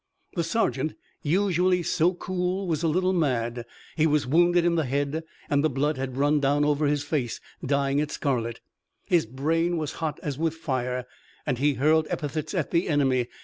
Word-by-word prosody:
The 170 Hz, -, 0 dB
sergeant, 160 Hz, -5 st, 0 dB, 0.3 s
usually 180 Hz, +1 st, +2 dB
so 175 Hz, +2 st, +2 dB
cool, 185 Hz, +1 st, -2 dB
was 160 Hz, -4 st, -1 dB
a 165 Hz, -, +1 dB
little 185 Hz, +4 st, +2 dB
mad. 120 Hz, -7 st, 0 dB, 0.3 s
He 160 Hz, 0 st, +3 dB
was 150 Hz, -2 st, +2 dB
wounded 175 Hz, +5 st, +4 dB
in 175 Hz, -, +3 dB
the 160 Hz, -3 st, +1 dB
head, 140 Hz, +4 st, -1 dB, 0.2 s
and 145 Hz, -2 st, +2 dB
the 155 Hz, -, +3 dB
blood 145 Hz, +2 st, 0 dB
had 130 Hz, -1 st, -4 dB
run 145 Hz, +2 st, +3 dB
down 145 Hz, +1 st, +2 dB
over 150 Hz, 0 st, +2 dB
his 145 Hz, 0 st, +1 dB
face, 130 Hz, -7 st, -2 dB, 0.2 s
dyeing 140 Hz, +1 st, +1 dB
it 150 Hz, 0 st, 0 dB
scarlet. 120 Hz, -7 st, -2 dB, 0.4 s
His 170 Hz, -9 st, +2 dB
brain 165 Hz, +7 st, 0 dB
was 155 Hz, -2 st, -2 dB
hot 155 Hz, -2 st, -2 dB
as 145 Hz, -2 st, -3 dB
with 165 Hz, -1 st, 0 dB
fire, 125 Hz, -5 st, -2 dB, 0.4 s
and 125 Hz, -, -1 dB
he 145 Hz, 0 st, +2 dB
hurled 155 Hz, +3 st, +3 dB
epithets 155 Hz, +3 st, -3 dB
at 170 Hz, -6 st, -1 dB
the 170 Hz, +1 st, +1 dB
enemy. 135 Hz, -5 st, +2 dB
150 Hz, 185 wpm, -26 LUFS, 140-170 Hz, 0.4 s, wounded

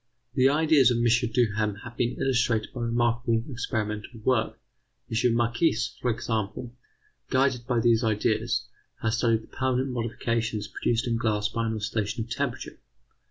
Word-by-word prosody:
The 130 Hz, +1 st, +4 dB
ideas 150 Hz, -3 st, +5 dB
of 120 Hz, -, +1 dB
M. 120 Hz, -, +1 dB, 0.3 s
Duhem 110 Hz, -3 st, +1 dB
have 120 Hz, -1 st, -9 dB
been 120 Hz, 0 st, -1 dB
illustrated 125 Hz, -4 st, +1 dB
by 125 Hz, -, -5 dB
remarkable 120 Hz, 0 st, +1 dB
experimental 110 Hz, -1 st, -3 dB
work. 120 Hz, -1 st, 0 dB, 0.5 s
M. 115 Hz, +1 st, +2 dB
Marchis, 120 Hz, +1 st, +1 dB
for 125 Hz, -, 0 dB
example, 115 Hz, +1 st, -3 dB, 0.6 s
guided 130 Hz, -2 st, +1 dB
by 125 Hz, -2 st, +1 dB
these 115 Hz, 0 st, +3 dB
ideas, 110 Hz, -2 st, 0 dB, 0.4 s
has 115 Hz, +1 st, +1 dB
studied 115 Hz, -2 st, +2 dB
the -, -, -16 dB
permanent 130 Hz, 0 st, 0 dB
modifications 115 Hz, -2 st, -2 dB
produced 120 Hz, +2 st, -1 dB
in 115 Hz, -2 st, 0 dB
glass 105 Hz, -2 st, 0 dB
by 115 Hz, +1 st, -2 dB
an 110 Hz, -, -1 dB
oscillation 105 Hz, 0 st, -2 dB
of 115 Hz, -, -13 dB
temperature. 130 Hz, -1 st, -3 dB
115 Hz, 150 wpm, -27 LUFS, 110-125 Hz, 0.6 s, ideas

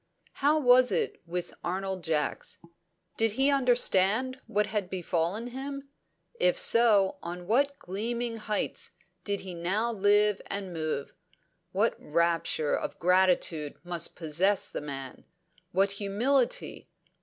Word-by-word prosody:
How 295 Hz, +3 st, +4 dB
was 250 Hz, -2 st, +6 dB
it -, -, -1 dB
with 175 Hz, +1 st, -4 dB
Arnold 190 Hz, 0 st, -3 dB
Jacks? 155 Hz, -2 st, -1 dB, 0.6 s
Did 225 Hz, -2 st, +2 dB
he 270 Hz, +5 st, +3 dB
understand 250 Hz, -1 st, +2 dB
what 210 Hz, +1 st, +1 dB
had 210 Hz, -3 st, -3 dB
befallen 180 Hz, +3 st, -2 dB
him? 275 Hz, +2 st, -6 dB, 0.5 s
If -, -, +3 dB
so, 210 Hz, -5 st, +4 dB
on 175 Hz, +1 st, -6 dB
what 280 Hz, +8 st, +1 dB
gleaming 230 Hz, +5 st, -3 dB
heights 215 Hz, -1 st, -2 dB, 0.3 s
did 200 Hz, -1 st, -2 dB
he 190 Hz, -1 st, -7 dB
now 195 Hz, +7 st, -1 dB
live 205 Hz, -1 st, +3 dB
and 195 Hz, -3 st, -4 dB
move! 155 Hz, -3 st, -3 dB, 0.6 s
What -, -, +2 dB
rapture 165 Hz, -1 st, 0 dB
of -, -, -4 dB
gratitude 180 Hz, -4 st, +2 dB
must 175 Hz, -2 st, -1 dB
possess 180 Hz, +5 st, +1 dB
the -, -, -4 dB
man! 135 Hz, -3 st, -7 dB, 0.5 s
What 195 Hz, +2 st, +2 dB
humility! 220 Hz, +7 st, -1 dB
200 Hz, 120 wpm, -28 LUFS, 175-235 Hz, 0.6 s, was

